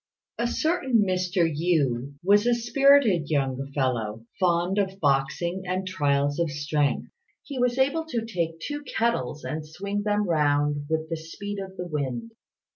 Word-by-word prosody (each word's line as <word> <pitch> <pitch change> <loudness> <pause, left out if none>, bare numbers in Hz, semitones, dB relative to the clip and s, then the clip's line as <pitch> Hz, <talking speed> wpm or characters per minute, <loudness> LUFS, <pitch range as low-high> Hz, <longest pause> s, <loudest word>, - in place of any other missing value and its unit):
A 235 - +1
certain 265 - +1
Mr. 180 -1 +1
Yü 145 -5 0
was 205 +4 +4
a 240 - +4
spirited 235 - +4
young 135 -2 -1
fellow, 115 -5 -1
fond 180 +2 +2
of 195 -1 -1
boxing 155 +5 +1
and 185 +1 -1
trials 145 -4 +1
of 170 -2 +1
strength. 145 0 -1 0.3
He 275 -3 -6
was 245 0 +1
able 280 +5 +2
to 235 -8 -3
take 170 -7 -2
two 290 - -4
kettles 225 - -1
and 155 0 -4
swing 200 +7 -4
them 205 0 0
round 145 -2 +2
about 145 - -6
with 160 0 -1
the 165 - -1
speed 200 +6 -6
of 190 -1 -7
the 180 - -4
wind. 150 - -3
175 Hz, 160 wpm, -26 LUFS, 145-210 Hz, 0.3 s, was